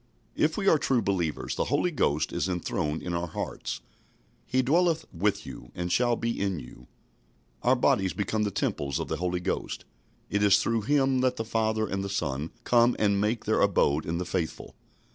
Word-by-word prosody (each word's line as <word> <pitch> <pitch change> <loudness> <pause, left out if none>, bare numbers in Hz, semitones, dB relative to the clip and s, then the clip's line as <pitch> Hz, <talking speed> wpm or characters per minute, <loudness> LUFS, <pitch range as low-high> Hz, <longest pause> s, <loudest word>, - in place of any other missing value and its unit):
If 155 +1 +1
we 200 -2 -1
are 160 - +6
true 130 -5 +1
believers, 85 -6 -1
the - - -1
Holy 180 - +1
Ghost 75 - 0
is 95 - -1
enthroned 80 -3 -2
in 90 - -3
our 85 +1 -1
hearts. 80 - -5 0.7
"He 130 0 +2
dwelleth 165 +4 +2
with 100 +4 0
you, - - -10
and 90 0 -3
shall 120 +2 +3
be 115 -2 -2
in 100 -3 0
you." 60 -1 -12 0.7
Our - - +4
bodies 95 -2 +2
become 105 +1 -1
the 105 - +1
temples 70 -7 -1
of - - -4
the - - -1
Holy 90 0 -1
Ghost. 95 - -3 0.4
It 100 - 0
is 100 -1 +6
through 115 +2 0
Him 135 -3 +3
that 130 0 +2
the 115 - -3
Father 110 -1 0
and 95 0 -2
the 100 - -4
Son 75 -5 -2
come 120 0 +4
and 100 -2 +2
make 110 +2 0
their 110 - +2
abode 80 -6 +2
in 85 +1 -1
the 90 - -2
faithful. 85 -3 -3
100 Hz, 195 wpm, -28 LUFS, 90-120 Hz, 0.7 s, are